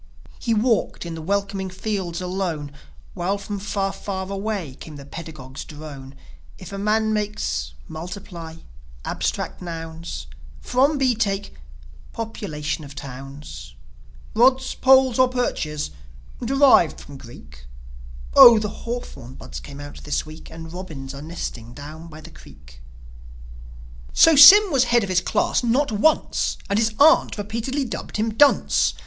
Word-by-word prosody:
He 230 -2 0
walked 225 -4 0
in 170 - -5
the 165 - -7
welcoming 195 +2 -2
fields 185 -2 -4
alone, 180 -6 -3 0.4
While 190 +2 -1
from 200 0 -6
far, 195 -1 -2
far 190 -2 -5
away 195 -7 -3
came 155 - -10
the 140 -1 -10
pedagogue's 140 -4 -9
drone: 145 -3 -10 0.4
"If 185 +1 -10
a 195 - -4
man 215 +1 +1
makes.. 135 - -2
.Multiply... 170 -1 -8 0.5
Abstract - - -3
nouns... 165 - -6 0.3
From 275 +4 +2
B 260 -2 +3
take.. 200 -3 -2 0.6
.Population 160 -9 -4
of 140 -1 -11
towns... 135 - -9 0.6
Rods, 260 +3 +3
poles 260 -2 +4
or 255 - +6
perches... 155 - -2 0.5
Derived 265 - +4
from 145 -1 -11
Greek 70 - -14 0.7
Oh, 235 -1 +10
the 210 -1 -1
hawthorn 200 - -7
buds - - -8
came 140 -1 -11
out 145 0 -10
this 150 - -2
week, 155 +1 -12
And 160 0 -10
robins 155 -8 -7
are 140 - -8
nesting 125 -7 -7
down 155 +3 -9
by 155 -1 -11
the 165 +2 -12
creek. 65 - -16 1.3
So 325 -1 +6
Sym 385 +8 +10
was 265 -3 +3
head 240 -2 +3
of 200 - -4
his 180 -1 +2
class 185 - 0
not 245 +3 +1
once; 230 +10 +1
And 200 - +2
his 220 -1 0
aunt 310 -3 +5
repeatedly 230 +7 -3
dubbed 230 - -6
him 220 +1 -1
"Dunce." 285 +5 +3
185 Hz, 140 wpm, -22 LUFS, 150-225 Hz, 1.3 s, Oh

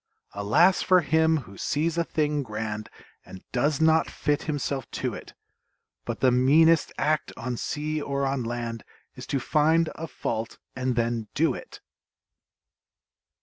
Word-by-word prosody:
Alas 115 - +3
for 185 -1 +4
him 160 +1 +3
who 100 - -13
sees 155 +2 0
a 170 - +1
thing 150 -2 0
grand 110 -3 -5 0.3
And 95 - -12
does 140 +3 +1
not 160 0 +4
fit 145 +1 -1
himself 140 -4 -3
to - - -3
it! - - -10 0.7
But - - -4
the 130 - +5
meanest 150 +6 +4
act, 155 0 0
on 125 0 -3
sea 150 +4 -3
or 140 -1 -1
on 135 -1 -1
land, 115 -1 -4 0.3
Is - - -10
to 140 - 0
find 160 +5 +2
a 165 - -6
fault, 115 -6 -4 0.2
and 130 -1 -1
then 115 -2 -1
do - - +2
it! - - -10
140 Hz, 145 wpm, -26 LUFS, 120-160 Hz, 0.7 s, the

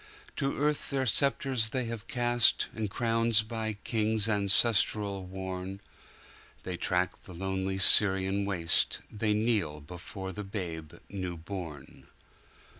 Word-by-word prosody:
To 140 -2 -1
earth 150 +1 -1
their 135 -2 -1
sceptres 130 -2 +2
they 130 +1 -2
have 115 -1 -6
cast, 120 -1 +3
And 110 -2 -3
crowns 115 0 +3
by 110 -1 -3
kings 110 -1 +1
ancestral 100 -1 +3
worn; 95 0 -6 0.8
They 90 - -4
track 90 +1 -1
the 90 - -11
lonely 95 +1 -2
Syrian 95 0 +4
waste; 90 -5 +1
They 105 0 0
kneel 105 -9 0
before 90 +5 -8
the 105 +3 -6
Babe 85 -6 -6
new 90 -3 -5
born. 80 -5 -9
100 Hz, 120 wpm, -29 LUFS, 95-115 Hz, 0.8 s, Syrian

